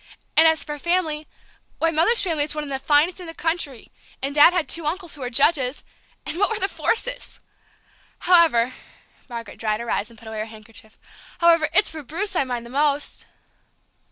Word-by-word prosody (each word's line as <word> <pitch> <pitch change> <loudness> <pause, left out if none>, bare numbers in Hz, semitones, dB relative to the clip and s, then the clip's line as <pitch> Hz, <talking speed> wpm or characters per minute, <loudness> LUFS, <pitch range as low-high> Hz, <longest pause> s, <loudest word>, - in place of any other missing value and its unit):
And 320 - +7
as 320 -1 +2
for 295 -1 -6
family, 320 -2 -1 0.5
why, 330 0 +1
Mother's 335 +10 +2
family 320 -6 +1
is 300 - -8
one 300 - -3
of 285 - -7
the 270 - -2
finest 295 +6 +2
in 360 - -8
the 330 - -8
country, 325 -7 -3 0.3
and 275 +1 -2
Dad's 300 +5 +6
had 345 -4 0
two 330 -3 +2
uncles 345 +1 -4
who 290 - -8
were 250 - -3
judges 270 +1 +2 0.4
and 330 - -4
what 405 - +3
were 445 - -1
the 390 - +1
Forsythes! - - -2 0.8
However," 320 -9 +4 0.6
Margaret 230 -3 -8
dried 215 -1 -1
her 235 0 -4
eyes 210 - -1
and 230 - -17
put 225 - -14
away 220 -1 -6
her 215 - -2
handkerchief, 220 +1 -14 0.4
"however, 335 -2 +4
it's 360 +5 +3
for 320 -1 -7
Bruce 370 +8 -4
I 275 - +2
mind 240 -2 -4
most!" 290 +1 -1
300 Hz, 190 wpm, -22 LUFS, 255-340 Hz, 0.8 s, And